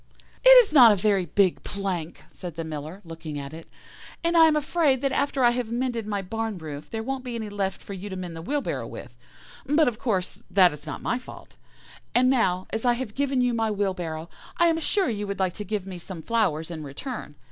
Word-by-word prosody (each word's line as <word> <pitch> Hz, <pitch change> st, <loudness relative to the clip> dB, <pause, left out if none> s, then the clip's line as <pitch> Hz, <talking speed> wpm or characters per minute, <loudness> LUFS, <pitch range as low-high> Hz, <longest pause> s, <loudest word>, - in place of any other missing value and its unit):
"'It -, -, +8 dB, 0.2 s
is 355 Hz, -, -8 dB
not 245 Hz, -6 st, +9 dB
a -, -, +4 dB
very 195 Hz, -2 st, +1 dB
big 195 Hz, -3 st, +2 dB
plank,' 185 Hz, -5 st, -4 dB
said 175 Hz, -4 st, -7 dB
the 165 Hz, -, -4 dB
Miller, 155 Hz, +4 st, -6 dB
looking 165 Hz, -2 st, -7 dB
at 140 Hz, +1 st, -6 dB
it, 165 Hz, 0 st, -10 dB, 0.6 s
'and 335 Hz, +1 st, +1 dB
I 325 Hz, -1 st, +8 dB
am 310 Hz, -, +3 dB
afraid 300 Hz, -3 st, +2 dB
that 275 Hz, -1 st, +1 dB
after 275 Hz, -1 st, 0 dB
I 240 Hz, -, +6 dB
have 240 Hz, -2 st, -3 dB
mended 240 Hz, -2 st, -2 dB
my 205 Hz, -2 st, -2 dB
barn 225 Hz, +1 st, -3 dB
roof 150 Hz, -3 st, -8 dB
there 225 Hz, -1 st, -4 dB
won't 265 Hz, +1 st, -3 dB
be 245 Hz, -2 st, -5 dB
any 220 Hz, -2 st, -4 dB
left 200 Hz, -1 st, -3 dB
for 200 Hz, -, -7 dB
you 195 Hz, +2 st, -6 dB
to 190 Hz, -, -5 dB
mend 180 Hz, -3 st, -6 dB
the 165 Hz, -, -6 dB
wheelbarrow 285 Hz, -, -2 dB
with; -, -, -10 dB, 0.5 s
but, 295 Hz, +2 st, +3 dB
of 230 Hz, -3 st, -1 dB
course, 200 Hz, -3 st, -2 dB
that 185 Hz, -4 st, +5 dB
is 150 Hz, +1 st, -11 dB
not -, -, -6 dB
my 240 Hz, -, 0 dB
fault. 255 Hz, -, -13 dB, 0.6 s
And 255 Hz, +1 st, +5 dB
now, 185 Hz, -8 st, +1 dB
as 220 Hz, -, -2 dB
I 245 Hz, -1 st, +4 dB
have 240 Hz, -3 st, -4 dB
given 275 Hz, -1 st, 0 dB
you 245 Hz, -1 st, +2 dB
my 225 Hz, -1 st, 0 dB
wheelbarrow, 180 Hz, -6 st, -2 dB, 0.3 s
I 340 Hz, 0 st, +5 dB
am 325 Hz, 0 st, +1 dB
sure 385 Hz, +4 st, +1 dB
you 210 Hz, -3 st, -2 dB
would 200 Hz, -1 st, -3 dB
like 185 Hz, -2 st, 0 dB
to 210 Hz, -, -6 dB
give 205 Hz, -1 st, -3 dB
me 185 Hz, -2 st, -7 dB
some 170 Hz, -2 st, -8 dB
flowers 175 Hz, -8 st, 0 dB
in 160 Hz, -2 st, -6 dB
return. 150 Hz, -, -7 dB
205 Hz, 230 wpm, -25 LUFS, 180-250 Hz, 0.6 s, not